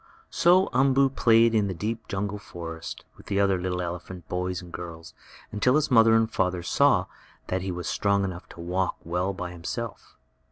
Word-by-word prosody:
So 180 +3 +4
Umboo 135 +1 +4
played 115 -3 +4
in 105 -2 +2
the 95 - -3
deep 110 +5 -4
jungle 105 0 -3
forest 80 -4 -8
with - - -17
the 100 -1 0
other 95 -2 +2
little 90 0 -2
elephant 90 0 -7
boys 90 0 -2
and 85 -1 -12
girls 85 -2 -8 0.4
until 125 +5 +2
his 155 -1 +1
mother 115 -2 +6
and 115 0 +3
father 90 -1 0
saw - - +3 0.4
that 95 0 -1
he 95 0 -3
was 90 0 -5
strong 100 -1 +1
enough 90 -2 -5
to - - -13
walk 90 +2 -1
well 90 +3 -1
by 90 -2 -5
himself. 100 +6 -6
95 Hz, 185 wpm, -26 LUFS, 90-115 Hz, 0.4 s, mother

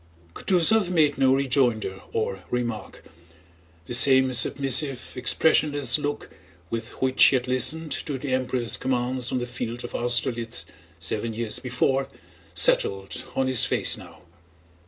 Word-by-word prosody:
Kutúzov 185 - +3
made 155 -6 +2
no 130 -1 +4
rejoinder 120 -8 0
or 100 -3 -2
remark. 120 -4 -4 0.8
The - - -6
same 130 +1 +4
submissive, 135 +1 +1
expressionless 145 0 +3
look 145 0 -4 0.4
with 115 0 -4
which 130 0 +3
he - - +5
had 125 0 -1
listened 150 +5 0
to 145 -3 -3
the 130 0 -4
Emperor's 125 -2 -1
commands 125 -1 -2
on - - -1
the 120 - -2
field 120 -1 -6
of 120 - -8
Austerlitz 120 -5 -1 0.3
seven 105 +7 -3
years 110 -2 -3
before 130 +2 -1 0.5
settled 100 +6 +1
on 135 - +1
his 130 -3 +3
face - - +3
now. - - -14
125 Hz, 135 wpm, -24 LUFS, 120-135 Hz, 0.8 s, he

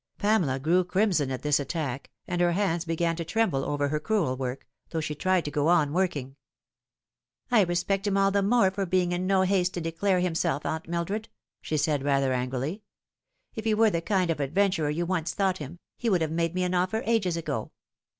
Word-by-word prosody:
Pamela 205 -11 +2
grew 165 +7 +2
crimson 180 -6 +1
at 130 -1 -4
this 150 -1 +3
attack, 140 -2 -4 0.2
and 175 -1 -1
her 175 -1 +3
hands 175 -3 0
began 165 0 0
to 170 - -2
tremble 165 -7 0
over 145 0 -1
her 150 +1 -1
crewel 165 -7 0
work, 130 0 -4 0.2
though 165 - -2
she 150 -1 -3
tried 185 +3 +1
to 145 - -3
go 145 0 0
on 160 -4 +3
working. 150 -7 -1 0.5
'' - - -46
I 235 -3 +6
respect 190 +3 -1
him 200 -1 +1
all 195 0 +3
the 200 0 +2
more 200 -1 +3
for 195 0 -3
being 180 0 +1
in 180 +1 -1
no 190 -1 +3
haste 185 -1 +1
to - - -2
declare 175 +3 0
himself, 165 -5 0
Aunt 160 0 -3
Mildred," 195 +6 -2 0.3
she 155 - -2
said, 145 -1 +1
rather 135 -2 +2
angrily. 130 - -2 0.4
" - - -44
If 220 - -4
he 220 -1 +2
were 220 0 +4
the 170 - -1
kind 185 -2 +1
of 160 - -3
adventurer 165 +2 +1
you 165 +4 -1
once 170 -3 -2
thought 190 -2 +1
him, 150 +3 -7 0.2
he 235 - 0
would 185 -5 +2
have 160 -1 -1
made 165 +1 -1
me 185 - +1
an 180 0 -1
offer 185 +5 0
ages 200 -7 +1
ago. 150 -9 -3
175 Hz, 215 wpm, -27 LUFS, 150-190 Hz, 0.5 s, I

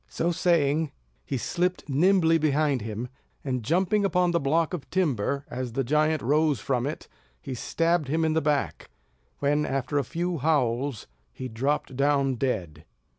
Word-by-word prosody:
So 170 - 0
saying, 160 -3 +2 0.4
he 135 - -1
slipped 180 +8 -1
nimbly 165 +3 +3
behind 150 -3 +1
him, 110 +3 -4 0.4
and 125 -3 -2
jumping 185 - +1
upon 180 -2 +2
the 170 - +2
block 160 +5 +1
of 170 -6 -5
timber, 140 - 0
as 125 -1 -5
the 135 - 0
giant 155 +3 +1
rose 150 0 +2
from 125 +2 -1
it, 150 - -6 0.3
he 130 - -6
stabbed 165 +5 0
him 160 +3 +1
in 160 - +1
the 160 - +2
back; 145 -1 -1 0.5
when, 145 +1 +1
after 135 0 -1
a - - 0
few 170 +5 -3
howls, 135 -4 0 0.3
he 130 - -6
dropped 130 +3 -2
down 140 0 +2
dead. 95 - -3
145 Hz, 160 wpm, -26 LUFS, 130-165 Hz, 0.5 s, nimbly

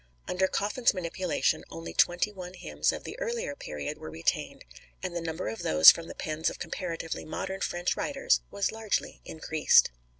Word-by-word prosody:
Under 190 +1 +1
Coffin's 210 +4 +1
manipulation 180 0 -1
only 80 0 -7
twenty 175 - +3
one 185 -2 -9
hymns - - 0
of - - -6
the - - -8
earlier 475 -8 -3
period 75 - -6
were - - -7
retained, 80 +1 -2 0.4
and - - -4
the 170 - -2
number 165 +1 -4
of 110 +1 -4
those 80 0 +9
from 165 0 -7
the - - -8
pens 155 +1 -1
of - - -8
comparatively 165 -3 -4
modern 190 +4 -5
French 175 0 -1
writers 275 -1 +1
was 200 -1 -1
largely 220 -2 -2
increased. 155 - +3
175 Hz, 170 wpm, -29 LUFS, 155-200 Hz, 0.4 s, those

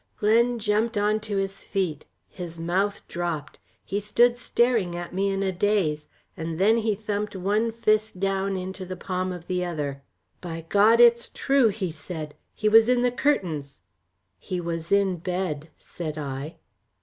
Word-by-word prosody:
Glen 235 +3 +3
jumped 220 +1 0
on 210 +1 +2
to 210 -2 -4
his 195 0 -2
feet, 180 -7 -2 0.2
his 170 -2 -8
mouth 190 +5 -1
dropped, 170 -6 -4 0.3
he 200 - -1
stood 240 +4 +3
staring 235 -6 +1
at 175 0 -6
me 195 +2 +1
in 195 0 -1
a 190 - +1
daze, 180 -6 0 0.3
and 160 0 -4
then 210 +5 +4
he 220 -2 +1
thumped 210 0 -3
one 205 +5 +1
fist 215 -3 +1
down 195 0 0
into 185 +1 -5
the 185 0 -6
palm 185 0 -2
of 175 -2 -7
the 180 0 -1
other. 145 -5 -3 0.4
"By 165 -2 -6
God 215 +3 +5
it's 235 0 +6
true," 270 -3 +3
he 195 -4 -2
said, 155 -1 -7 0.2
"he 215 - 0
was 225 +2 +6
in 250 -1 +3
the 245 - +3
curtains." 170 - -1 0.6
"He 185 - -4
was 165 -1 -4
in 200 -2 +3
bed," 175 -3 -3
said 155 -3 -6
I. 140 +1 -5
195 Hz, 165 wpm, -25 LUFS, 170-215 Hz, 0.6 s, it's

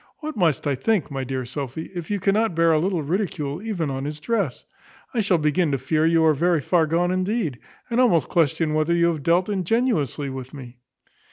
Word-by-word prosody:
What 310 -1 -6
must 170 -8 +1
I 145 - +1
think, 165 - 0
my 135 -1 -3
dear 130 0 -3
Sophy, 135 +5 -6
if 175 -3 -6
you 205 -1 -1
cannot 200 0 +1
bear 165 0 +4
a 155 - +3
little 175 -1 -1
ridicule 155 -2 -2
even 185 -10 -2
on 135 +1 -4
his 150 +1 -5
dress? 185 - -2 0.5
I 235 - +1
shall 195 -4 +2
begin 155 +1 +1
to - - +2
fear 155 +5 +1
you 165 -1 +3
are 155 - +5
very 170 +3 +2
far 160 +3 +2
gone 175 +3 +1
indeed; 185 - -1 0.3
and 240 +1 +1
almost 175 - +3
question 160 -2 +1
whether 155 +2 +1
you 170 0 +3
have 155 -3 -5
dealt 170 +5 +2
ingenuously 185 - 0
with 130 +1 -8
me." 125 -3 -11
165 Hz, 205 wpm, -23 LUFS, 145-185 Hz, 0.5 s, are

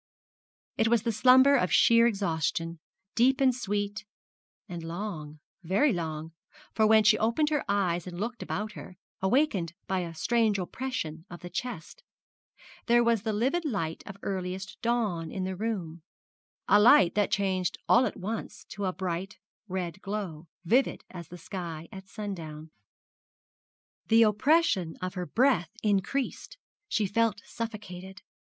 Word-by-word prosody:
It 225 - +3
was 230 -2 +3
the 230 - 0
slumber 260 +5 +6
of 185 - +1
sheer 230 +8 +6
exhaustion, 165 -5 -1 0.3
deep 260 +3 +3
and 265 -2 +4
sweet, 205 -3 -3 0.6
and 175 -4 -6
long 165 -3 -6 0.2
very 200 - +2
long; 160 -2 -4 0.4
for 220 -1 +3
when 220 0 +6
she 215 +1 +5
opened 265 +8 +1
her 295 - +1
eyes 185 -4 0
and 175 -1 -7
looked 235 +4 -4
about 215 +1 -3
her, 185 -2 -11 0.2
awakened 190 - +1
by 190 -1 -1
a 170 -2 -5
strange 225 +4 +2
oppression 180 -5 -4
of 175 - -10
the 175 - -8
chest, 245 - -6 0.9
there 240 0 +5
was 235 -3 +2
the 220 +1 -2
livid 260 +11 0
light 195 - -2
of 195 - -8
earliest 190 +1 -4
dawn 215 -9 0
in 190 - -3
the 190 0 -3
room 180 -6 -4 0.7
a 205 - +6
light 210 -7 +7
that 205 -1 +1
changed 190 -3 0
all 250 +1 +5
at - - -6
once 210 +2 -5
to 205 -1 -4
a 185 - +1
bright 185 +1 -4 0.3
red 185 -1 -4
glow, 190 -6 -5 0.2
vivid 250 +10 +2
as 170 -3 -8
the 180 - -10
sky 170 -4 -6
at 190 0 -10
sundown. 165 -8 -7 1.4
The 225 +1 +6
oppression 210 - +2
of 185 0 -4
her 180 -2 -4
breath 240 -10 +2
increased, 230 - -1 0.3
she 215 - +1
felt 210 +1 0
suffocated. 195 -4 -7
200 Hz, 145 wpm, -28 LUFS, 175-230 Hz, 1.4 s, light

